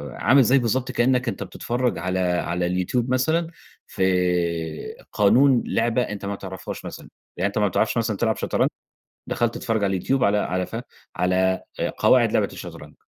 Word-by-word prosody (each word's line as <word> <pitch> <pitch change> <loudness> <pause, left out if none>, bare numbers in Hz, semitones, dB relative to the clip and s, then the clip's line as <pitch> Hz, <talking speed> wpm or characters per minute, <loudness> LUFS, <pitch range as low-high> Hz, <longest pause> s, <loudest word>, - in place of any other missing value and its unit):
عامل 135 +2 +4
زي 130 +4 +4
بالضبط 125 +2 -1
كإنّك 125 +1 +1
أنت 115 - -3
بتتفرّج 125 +1 -2
على 90 +2 -2
على 90 -1 0
اليوتيوب 95 +8 -1
مثلًا 160 +6 +1 0.4
في 95 - -3 1.1
قانون 120 +5 +4
لعبة 115 +2 +1
أنت 105 -4 -4
ما 100 0 -2
تعرفهاش 95 -2 -7
مثلًا، - - -9 0.3
يعني 95 +3 +1
أنت 100 - -5
ما 105 -1 +3
بتعرفش 110 +5 0
مثلًا 110 -3 0
تلعب 110 0 +1
شطرنج، - - +1 0.6
دخلت 120 -1 0
تتفرّج 110 -3 -1
على 100 - +1
اليوتيوب 130 +8 0
على 100 +1 +3
على 90 -2 -1
ف - - -7 0.4
على 95 +1 +1 0.2
آآ، - - 0
قواعد - - +4
لعبة - - +2
الشطرنج - - -10
110 Hz, 165 wpm, -23 LUFS, 95-125 Hz, 1.1 s, عامل